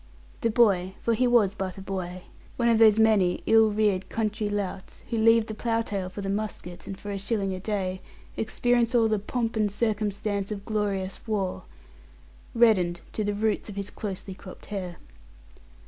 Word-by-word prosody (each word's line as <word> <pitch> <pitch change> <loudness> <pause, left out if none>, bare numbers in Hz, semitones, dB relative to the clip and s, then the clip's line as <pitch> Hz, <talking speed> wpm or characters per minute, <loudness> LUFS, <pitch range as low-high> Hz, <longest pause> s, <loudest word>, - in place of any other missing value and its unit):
The 230 - +2
boy 195 -5 +3
for 230 - +1
he 250 +3 +2
was 225 -5 +4
but 190 -2 -4
a - - -7
boy, 185 -2 -5 0.3
one 235 - +2
of 230 -1 +4
those 220 -2 +7
many 215 -5 +3
ill 225 -1 +5
reared 205 -3 +1
country 215 -1 -1
louts 200 -2 -4
who 230 - 0
leave 225 0 +5
the 220 - -6
plough 230 +1 0
tail 195 -4 -3
for 195 +2 -7
the 195 - -4
musket, 195 -3 -4
and, 195 -1 -6
for 205 - -6
a 200 - -3
shilling 200 -1 -1
a 185 - -4
day, 190 -2 -2 0.3
experience 240 +2 +1
all 230 -2 +5
the 215 -1 +1
"pomp 230 +2 -2
and 210 -2 +1
circumstance 205 -2 -1
of 200 -1 -5
glorious 200 -3 -1
war" 195 -4 -2 0.9
reddened 185 -7 +3
to 215 - -1
the 205 0 -1
roots 215 +1 0
of 205 - -7
his 200 -1 -4
closely 200 -2 -5
cropped 185 0 -12
hair. 180 -3 -4
205 Hz, 180 wpm, -27 LUFS, 195-220 Hz, 0.9 s, those